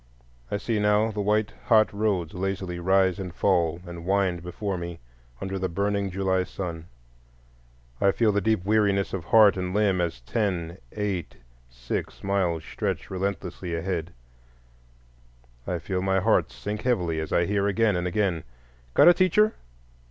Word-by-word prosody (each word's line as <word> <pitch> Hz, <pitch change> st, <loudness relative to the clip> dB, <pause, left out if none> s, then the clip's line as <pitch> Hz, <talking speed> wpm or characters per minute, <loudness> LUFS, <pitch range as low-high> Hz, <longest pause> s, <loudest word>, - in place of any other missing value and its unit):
I -, -, -1 dB
see 110 Hz, +1 st, -1 dB
now 105 Hz, +2 st, +3 dB
the 105 Hz, -1 st, -3 dB
white, 105 Hz, +1 st, +1 dB
hot 110 Hz, -3 st, +4 dB
roads 100 Hz, -6 st, -1 dB
lazily 95 Hz, -1 st, -3 dB
rise 95 Hz, +1 st, +2 dB
and 95 Hz, -2 st, -5 dB
fall 85 Hz, -4 st, +2 dB
and 85 Hz, -1 st, -8 dB
wind 95 Hz, -2 st, +1 dB
before 95 Hz, +3 st, -4 dB
me 85 Hz, -1 st, -6 dB, 0.4 s
under 95 Hz, 0 st, -4 dB
the 95 Hz, 0 st, -1 dB
burning 100 Hz, +2 st, -1 dB
July 95 Hz, 0 st, 0 dB
sun; 85 Hz, -3 st, -6 dB, 1.1 s
I 100 Hz, -, +5 dB
feel 110 Hz, +1 st, +2 dB
the 100 Hz, 0 st, +1 dB
deep 110 Hz, -2 st, +1 dB
weariness 100 Hz, -2 st, +2 dB
of 90 Hz, -4 st, -4 dB
heart 105 Hz, -2 st, +6 dB
and 90 Hz, 0 st, -3 dB
limb 100 Hz, -4 st, +2 dB
as 85 Hz, -8 st, -2 dB
ten, 85 Hz, -, -2 dB
eight, 100 Hz, -6 st, -3 dB, 0.3 s
six -, -, -5 dB
miles 90 Hz, -5 st, 0 dB
stretch -, -, -4 dB
relentlessly 95 Hz, -2 st, -3 dB
ahead; 85 Hz, 0 st, -3 dB, 1.6 s
I 90 Hz, -, -1 dB
feel 90 Hz, +2 st, -3 dB
my 95 Hz, 0 st, +2 dB
heart 110 Hz, +4 st, +2 dB
sink 105 Hz, +1 st, -5 dB
heavily 90 Hz, -10 st, 0 dB
as 80 Hz, -1 st, -4 dB
I 85 Hz, -, +3 dB
hear 100 Hz, +1 st, +1 dB
again 105 Hz, 0 st, +2 dB
and 90 Hz, 0 st, -1 dB
again, 90 Hz, -4 st, 0 dB, 0.5 s
"Got -, -, +7 dB
a 175 Hz, -, +10 dB
teacher? 190 Hz, +5 st, +3 dB
95 Hz, 155 wpm, -26 LUFS, 90-105 Hz, 1.6 s, a